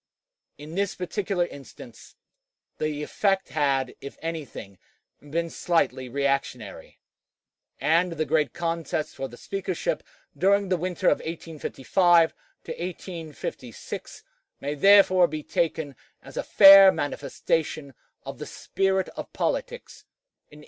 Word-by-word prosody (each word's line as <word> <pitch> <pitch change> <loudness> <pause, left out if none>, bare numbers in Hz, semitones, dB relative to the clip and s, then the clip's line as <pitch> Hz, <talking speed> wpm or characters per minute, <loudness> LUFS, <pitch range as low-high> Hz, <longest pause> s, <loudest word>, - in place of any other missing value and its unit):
In 150 +2 -10
this 200 +1 -1
particular 185 0 -1
instance 130 -6 -13 0.6
this 150 -1 -2
effect 195 +4 0
had, 135 -4 0
if 140 - -9
anything, 150 - -7 0.4
been 165 +3 -3
slightly 145 -7 0
reactionary, 135 -5 -3 0.8
and 170 +2 +2
the 155 -1 -2
great 150 -1 +1
contest 165 -3 -3
for 135 - -4
the 120 - -13
Speakership 185 -5 -3 0.3
during 200 +1 +2
the 185 - +3
winter 180 0 -4
of - - +2
1855 165 +1 +1 1.4
6 - - -8 0.4
may 145 +1 -3
therefore 185 +2 +6
be 155 -1 -6
taken 160 -4 -2 0.3
as - - -13
a - - -1
fair 195 0 +9
manifestation 145 -1 -2 0.3
of - - -8
the - - -6
spirit 190 -1 -1
of - - -8
politics - - -3 0.4
in 150 - -15
1854. - - -14
165 Hz, 115 wpm, -25 LUFS, 145-185 Hz, 1.4 s, fair